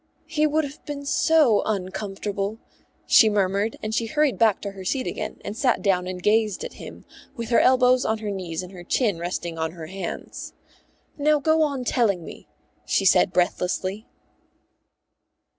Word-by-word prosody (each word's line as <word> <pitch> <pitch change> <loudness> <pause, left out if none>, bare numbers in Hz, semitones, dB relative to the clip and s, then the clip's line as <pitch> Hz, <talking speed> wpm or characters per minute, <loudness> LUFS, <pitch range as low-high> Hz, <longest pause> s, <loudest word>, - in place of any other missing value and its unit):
"He 305 -1 +1
would 310 +1 +1
have 285 +1 -8
been 285 -1 -6
so 285 -6 +4
uncomfortable," 200 +1 -3 0.5
she 220 - +6
murmured, 200 +1 0
and 215 0 -3
she 225 0 0
hurried 295 +3 +1
back 220 -3 +4
to 200 - -4
her 195 -1 -10
seat 255 +8 -1
again 215 0 -5
and 205 - -5
sat 250 +1 +1
down 180 -3 +1
and 180 -1 -6
gazed 215 -1 +2
at - - -6
him, - - -10 0.3
with 230 -1 -5
her 235 - +4
elbows 255 0 +4
on 220 - 0
her 215 -1 -4
knees 180 -3 -4
and 180 - -10
her 180 -2 -10
chin 205 -1 0
resting 170 -1 -4
on 160 0 -2
her 165 -2 -8
hands. 185 +1 -7 0.7
"Now 300 +1 +3
go 315 +2 +2
on 280 -4 0
telling 210 -9 +1
me," - - -11 0.4
she 195 - 0
said 180 - +5
breathlessly. 185 +3 -1
215 Hz, 170 wpm, -24 LUFS, 185-255 Hz, 0.7 s, she